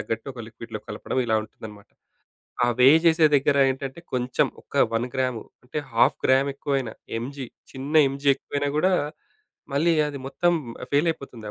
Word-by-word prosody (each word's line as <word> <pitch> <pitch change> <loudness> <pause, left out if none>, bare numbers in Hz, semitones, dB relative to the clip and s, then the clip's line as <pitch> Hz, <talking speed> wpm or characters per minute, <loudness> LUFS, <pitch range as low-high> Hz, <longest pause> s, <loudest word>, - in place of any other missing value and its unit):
తగ్గట్టు 115 0 -4
ఒక 120 - -7
లిక్విడ్‌లో 110 -2 -8
కలపడం, 105 +4 -3
ఇలా 110 -1 +2
ఉంటుందన్నమాట. 105 -1 -12 0.7
ఆ 120 - +4
వే 125 - +8 0.2
జేసే 160 -1 +5
దగ్గర 140 +1 +2
ఏంటంటే, 135 +3 -6 0.2
కొంచెం 125 0 +1 0.2
ఒక - - -14 0.2
1 115 +2 0
గ్రామ్ 130 -3 0 0.2
అంటే 125 +4 -7 0.2
హాఫ్ 115 - +4
గ్రామ్ 135 +2 +4
ఎక్కువైనా, 135 -6 -2 0.3
ఎంజీ, 130 +2 -6 0.2
చిన్న 135 +3 -6 0.2
ఎంజీ 140 +1 -5
ఎక్కువైనా 145 0 -3
గూడా, 185 +4 +3 0.8
మళ్ళీ 160 +5 +3 0.2
అది 145 -1 -5
మొత్తం 175 +5 +1 0.4
ఫెయిల్ 145 +4 +3
అయిపోతుంది 135 -8 -6
130 Hz, 150 wpm, -24 LUFS, 120-145 Hz, 0.8 s, వే